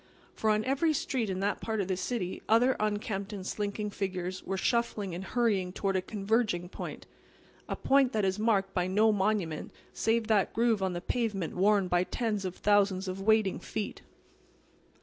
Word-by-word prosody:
For 220 - 0
on 215 0 +2
every 280 +5 +2
street 255 -6 -1
in 190 0 -2
that 205 +1 -1
part 220 -1 -2
of 195 - 0
the 190 - 0
city 185 0 -3
other 245 +4 +5
unkempt 210 -1 -2
and 190 -2 -6
slinking 210 +1 -3
figures 185 -2 -3
were 195 - -3
shuffling 215 -4 0
and 180 +2 -5
hurrying 200 -5 +1
toward 195 0 -1
a 185 - +2
converging 200 -2 0
point—a - - -9
point 270 -2 +3
that 215 -5 +1
is 190 +2 0
marked 200 -3 +1
by 180 0 0
no 215 +4 +4
monument 195 -6 -1 0.2
save 225 0 +1
that 215 -3 +2
groove 230 -3 +2
on 190 -1 0
the 175 - -4
pavement 205 -5 -2
worn 200 +1 +3
by 180 0 +2
tens 210 -1 -2
of 185 -1 -4
thousands 200 -2 +2
of 185 +1 -4
waiting 215 -1 +3
feet. 215 -2 -5
205 Hz, 175 wpm, -30 LUFS, 190-220 Hz, 0.2 s, other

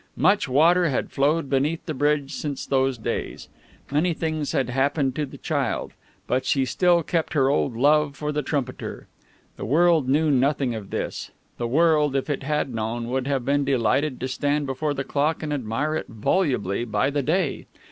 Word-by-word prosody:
Much 200 -4 +3
water 165 +6 +4
had 130 - -2
flowed 145 +3 +1
beneath 145 +5 0
the 155 - -3
bridge 145 0 0
since 145 -3 -4
those 135 -1 +1
days. 110 - -4 0.4
Many 160 +4 +1
things 155 -3 -2
had 130 -2 0
happened 135 0 +1
to 150 -2 -2
the - - -11
child. - - -2 0.3
But 130 +1 0
she 135 0 +1
still 175 +6 +2
kept 165 +1 -1
her 135 -3 +3
old 135 -4 0
love 145 +2 +3
for 150 +2 -3
the 150 0 -1
trumpeter. 135 -4 -4 0.5
The - - -5
world 160 +1 +3
knew 150 +2 +3
nothing 135 -1 +1
of 110 -3 -7
this. - - -4 0.3
The 120 - -1
world, 150 +1 +3
if 135 +2 -1
it 140 - -2
had 145 -2 -1
known, 115 +1 -3
would 130 +1 -1
have 135 -3 -1
been 140 +1 +2
delighted 135 +1 +1
to 130 - -1
stand 145 +3 0
before 145 +2 -2
the 135 - -2
clock 145 +4 -1
and 150 -1 -2
admire 140 +4 -2
it - - -3
volubly, 115 - 0
by 110 +4 0
the 145 0 0
day. 160 +1 -1
140 Hz, 185 wpm, -24 LUFS, 130-155 Hz, 0.5 s, water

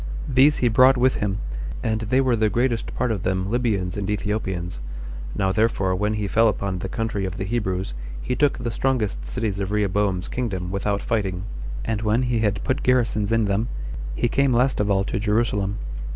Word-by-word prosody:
These 135 +3 +5
he - - +6
brought 130 +3 +6
with 130 +1 +3
him, 100 -1 -1 0.5
and 110 -1 0
they 125 +5 +2
were 130 -3 +2
the 110 -1 +2
greatest 120 0 0
part 125 -2 0
of 105 -4 -2
them 95 +1 -1
Libyans 105 -7 0
and 100 0 -3
Ethiopians. 95 - -2 0.6
Now 95 -2 +1
therefore 100 -3 +1
when 105 +3 0
he 105 -1 -1
fell 115 +3 +4
upon 100 -3 -1
the 95 - -4
country 110 -2 -2
of 95 0 -3
the 95 - -2
Hebrews, 95 - -2 0.3
he 125 - -2
took 145 0 +2
the 120 -1 -3
strongest 110 - -1
cities 100 - -2
of 100 0 -2
Rehoboam's 100 -3 +1
kingdom 95 -8 -3
without 100 +1 -1
fighting; 95 -5 -1 0.4
and 110 -1 -1
when 110 +3 +2
he 120 -2 +1
had 105 -3 0
put 130 +2 0
garrisons 115 -4 +2
in 115 -1 +3
them, 100 +3 0 0.5
he 120 - +1
came 135 +2 +2
last 125 +3 +2
of 105 0 +1
all 95 -1 +3
to 95 - -2
Jerusalem. 105 -2 +1
105 Hz, 195 wpm, -23 LUFS, 95-120 Hz, 0.6 s, he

